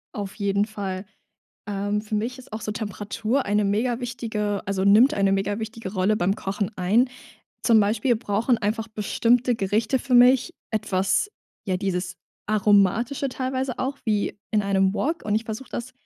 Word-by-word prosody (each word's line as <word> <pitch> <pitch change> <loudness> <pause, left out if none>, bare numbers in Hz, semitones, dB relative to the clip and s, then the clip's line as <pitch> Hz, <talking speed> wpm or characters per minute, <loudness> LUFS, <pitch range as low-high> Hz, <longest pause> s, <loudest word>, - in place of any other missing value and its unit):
Auf 200 -2 -5
jeden 200 -1 +1
Fall. 200 -3 -5 0.6
Ähm, 205 +1 -1
für 215 0 -4
mich 240 +5 -2
ist 255 - -14
auch 220 - -4
so 210 - -3
Temperatur 215 +4 -2
eine 210 +1 +2
megawichtige 225 -1 -1
also 195 -1 -1
nimmt 215 +8 +6
eine 195 -1 +2
megawichtige 205 +1 -2
Rolle 190 +2 +2
beim 195 +2 +1
Kochen 200 +2 -3
ein. 215 +8 +2 0.5
Zum 225 -2 +5
Beispiel 215 +4 +2
brauchen 225 +2 0
einfach 220 +2 -2
bestimmte 235 +3 +1
Gerichte 220 +5 +1
für 250 +1 -1
mich 250 +6 +6 0.2
etwas, 215 - 0 0.4
ja, 185 -2 +1
dieses 185 -1 -2 0.3
Aromatische 215 +6 +2
teilweise 260 0 -3
auch 270 +2 -2
wie 210 -2 0
in 215 -1 +2
einem 195 -1 +2
Wok, 315 +10 -2
und 210 - 0
ich 220 - 0
versuche 220 +4 -6
das 245 +2 -5
215 Hz, 155 wpm, -24 LUFS, 200-235 Hz, 0.6 s, nimmt